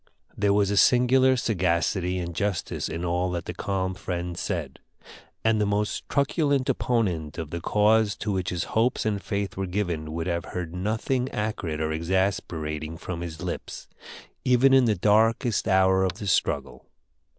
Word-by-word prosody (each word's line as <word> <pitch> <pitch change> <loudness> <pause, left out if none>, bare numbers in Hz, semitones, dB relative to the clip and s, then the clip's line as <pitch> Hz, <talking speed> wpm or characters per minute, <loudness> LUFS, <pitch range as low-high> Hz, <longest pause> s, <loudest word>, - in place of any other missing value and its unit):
There 100 -1 +2
was 100 0 +2
a 100 - 0
singular 130 +3 +5
sagacity 90 -3 0
and 85 -1 -4
justice 100 +1 -2
in 85 +1 -4
all 90 +1 0
that 85 -1 -3
the - - -5
calm 95 -1 -2
friend 90 -1 -4
said, - - -4 0.6
and 110 -1 +2
the - - +3
most 105 +1 -1
truculent 140 -1 +1
opponent 90 - 0
of 80 -2 -5
the 85 - -4
cause 105 +2 +3
to 105 - -3
which 95 -2 -1
his 90 0 -2
hopes 115 +2 +1
and 105 -2 0
faith 100 +2 -3
were 95 -1 -2
given 90 -5 -2
would 80 0 -3
have 85 -2 -2
heard 90 -2 -5
nothing 110 +7 -1
acrid 105 - -3
or 80 0 -1
exasperating 80 -3 -2
from 85 0 -6
his 80 -2 -6
lips, - - -6 0.6
even 125 +2 +4
in 130 -2 +6
the 110 -2 +2
darkest 110 +4 +2
hour 95 0 +4
of 95 -2 0
the 100 +2 -8
struggle. 90 - -1
95 Hz, 165 wpm, -26 LUFS, 85-110 Hz, 0.6 s, in